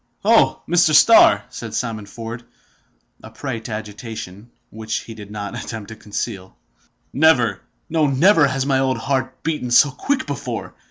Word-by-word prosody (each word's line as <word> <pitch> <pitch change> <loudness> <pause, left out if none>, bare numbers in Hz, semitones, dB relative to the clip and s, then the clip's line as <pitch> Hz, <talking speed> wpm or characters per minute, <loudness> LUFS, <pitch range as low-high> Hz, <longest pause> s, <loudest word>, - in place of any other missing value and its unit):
"Oh! - - +3
Mr. 165 -3 +3
Starr," 125 - +6
said 110 -2 -7
Simon 110 -4 -3
Ford, 115 +3 -8 0.8
a - - -11
prey 115 +1 -5
to 115 - -9
agitation, 110 -1 -8 0.2
which 110 0 -4
he 115 - -10
did 105 -2 -11
not 105 +2 -6
attempt 110 -2 -7
to 110 - -8
conceal, 105 -2 -6 0.6
"never, 130 -9 +3 0.3
no, 155 -2 +1
never 150 +3 +4
has 135 0 -2
my 135 -1 +1
old 130 -1 0
heart 130 -1 -3
beaten 150 -6 -2
so 140 +4 +5
quick 270 - -2
before! - - -5
120 Hz, 155 wpm, -20 LUFS, 110-140 Hz, 0.8 s, Starr